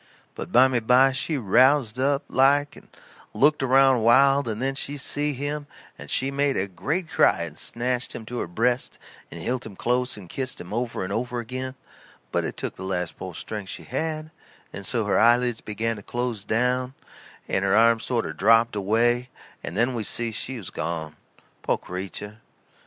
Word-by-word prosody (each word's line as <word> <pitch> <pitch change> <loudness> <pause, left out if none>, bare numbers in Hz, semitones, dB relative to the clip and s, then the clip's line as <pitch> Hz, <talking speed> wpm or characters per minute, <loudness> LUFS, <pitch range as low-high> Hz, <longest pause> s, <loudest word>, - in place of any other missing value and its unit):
But - - -7
bymeby 125 +1 +5
she 145 +3 -1
roused 125 +2 +3
up, 140 +1 +1
like, 140 +2 +3
and - - -15 0.5
looked 150 +1 +4
around 135 -1 +5
wild, 135 +3 +5
and 110 -1 -3
then 135 +2 0
she 145 +1 -4
see 145 +2 -1
him, 145 +2 -4 0.3
and 75 - -11
she 135 +1 0
made 140 0 +1
a 95 - +1
great 160 - -3
cry 85 - +3
and 80 -3 -7
snatched 125 +5 -2
him 110 - -7
to 120 +2 -5
her - - -3
breast 120 +8 0 0.3
and 85 - -9
hilt 125 +8 -2
him 105 -3 -9
close 125 +2 0
and 95 -4 -10
kissed 130 +7 -4
him 90 +3 -8
over 120 -3 -2
and 95 +2 -4
over 125 +2 -2
agin; 130 +3 -5 0.6
but - - 0
it - - -5
took - - -4
the - - -7
last 90 -3 -2
po' 95 -1 -7
strength 105 +2 -6
she - - -7
had, 155 +3 -3 0.4
and 100 -2 -6
so 115 -4 0
her 100 - +2
eyelids 120 0 +3
begin 110 +2 -2
to - - -9
close 120 -1 -3
down, 125 +4 0 0.5
and 95 - 0
her 100 +2 +3
arms 115 0 +4
sort 120 -2 -1
o' - - -4
drooped 115 +6 +4
away 120 +5 +1 0.3
and 85 - -5
then 120 +3 +2
we 115 -3 -2
see 115 +2 -1
she 125 +4 -4
was 100 -7 -7
gone, 80 -2 -4 0.5
po' - - +1
creetur. 100 +3 -7
120 Hz, 185 wpm, -25 LUFS, 105-130 Hz, 0.6 s, bymeby